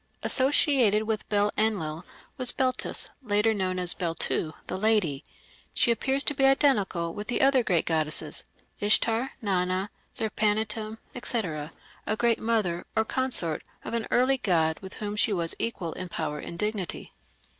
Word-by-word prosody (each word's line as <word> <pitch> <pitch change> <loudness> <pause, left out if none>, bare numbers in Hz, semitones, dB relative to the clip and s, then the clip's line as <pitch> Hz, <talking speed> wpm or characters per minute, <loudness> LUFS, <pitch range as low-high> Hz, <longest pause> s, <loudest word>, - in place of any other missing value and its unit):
Associated 260 -6 +4
with 220 -1 -3
Bel 205 0 +2
Enlil 185 -7 0 0.3
was 250 -1 +4
Beltis, 255 -1 +1
later 215 -2 +2
known 185 -3 -1
as 180 -1 -1
"Beltu 165 -2 -2
the - - -4
lady". 195 -10 +2 0.5
She 235 - +4
appears 265 +4 0
to 295 - +2
be 275 - -1
identical 210 - +3
with 210 0 -6
the 245 - 0
other 270 -1 +5
great 180 -8 +1
goddesses, 155 -1 -1 0.4
Ishtar, 225 +4 +2
Nana, 185 0 0 0.2
Zerpanituᵐ, 215 0 -1 0.3
&c., 165 - -2 0.4
a 215 - 0
"Great 235 0 +2
Mother", 210 -7 0
or 220 - +2
consort 245 - -1 0.2
of - - -5
an 230 -1 -1
early 255 +2 +3
god 160 -7 +1
with 190 0 -9
whom 210 -1 -4
she 210 +1 +2
was 170 -3 +2
equal 180 -8 -3
in 185 -1 -6
power 150 -3 -3
and 170 - -7
dignity. 210 -2 -3
210 Hz, 150 wpm, -27 LUFS, 175-230 Hz, 0.5 s, other